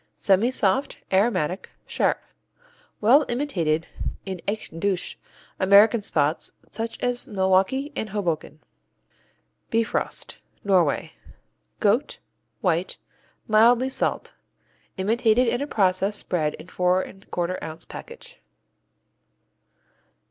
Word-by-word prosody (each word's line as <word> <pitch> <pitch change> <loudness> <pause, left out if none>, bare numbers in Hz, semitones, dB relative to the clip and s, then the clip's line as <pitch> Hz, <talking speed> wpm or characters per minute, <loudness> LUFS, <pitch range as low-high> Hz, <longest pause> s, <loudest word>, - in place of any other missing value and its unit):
Semisoft; 205 +3 +2 0.2
aromatic; 190 -3 +1 0.2
sharp. - - +1 0.8
Well 255 +8 +6
imitated 175 - 0 0.4
in 190 -3 -5
echt 205 -5 -4
Deutsche 190 -1 -1 0.4
American 205 +4 +6
spots 155 -5 0 0.2
such 225 +1 -4
as 245 -1 -1
Milwaukee 195 +9 +1
and 220 - -3
Hoboken. 170 -6 -3 1.1
Bifrost 230 0 -2 0.2
Norway 190 -4 +2 0.7
Goat; 225 +7 +1 0.4
white; 180 -3 0 0.5
mildly 235 +4 +5
salt. - - -2 0.6
Imitated 225 +4 +2
in 240 +3 0
a 285 - -2
process 195 -2 +1
spread 160 -6 -1
in - - -12
4 180 +1 +1
1/4 185 -2 -4
ounce 160 +1 -7
package. 485 +1 -11
200 Hz, 90 wpm, -24 LUFS, 185-235 Hz, 1.1 s, Well